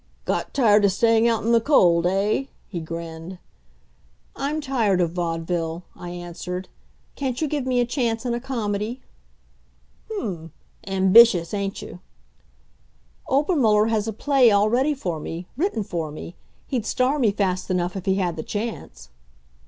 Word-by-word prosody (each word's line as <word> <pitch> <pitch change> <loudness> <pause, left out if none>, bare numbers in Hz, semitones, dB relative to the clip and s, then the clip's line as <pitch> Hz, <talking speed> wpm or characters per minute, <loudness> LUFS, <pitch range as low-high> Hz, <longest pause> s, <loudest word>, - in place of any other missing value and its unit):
"Got - - -2
tired 215 -6 +5
of 200 - +4
staying 225 +3 +3
out 230 -2 +1
in 230 - +1
the 230 -1 +5
cold 175 - +4
eh?" 200 +8 +1 0.2
he 180 - -5
grinned. 165 +2 -7 1.0
"I'm 290 +3 -2
tired 235 -10 +1
of 170 -2 +1
vaudeville," 165 -1 -2
I 175 - -8
answered. 175 +1 -6 0.5
"Can't 260 -3 -3
you 315 - 0
give 285 -3 -2
me 250 -1 +2
a 245 - +3
chance 235 -2 -1
in 240 - 0
a 240 - -1
comedy?" 230 -2 -3 1.1
"Hm! 175 - -5 0.3
Ambitious, 190 -1 +5
ain't 200 -1 -3
you?" 180 - -10 1.3
"Obermuller 260 - +3
has 220 -1 0
a - - -1
play 265 +2 +4
all 205 +1 +3
ready 270 +5 +2
for 175 - -3
me 165 +3 -6
written 305 - -1
for 170 -5 -4
me. 155 +4 -9 0.3
He'd 240 -5 -3
star 260 +4 +1
me 230 -6 +3
fast 185 -2 -1
enough 180 0 -1
if 190 -1 -6
he 190 - +3
had 180 -3 -1
the - - -2
chance." 210 - -6
205 Hz, 155 wpm, -23 LUFS, 175-245 Hz, 1.3 s, tired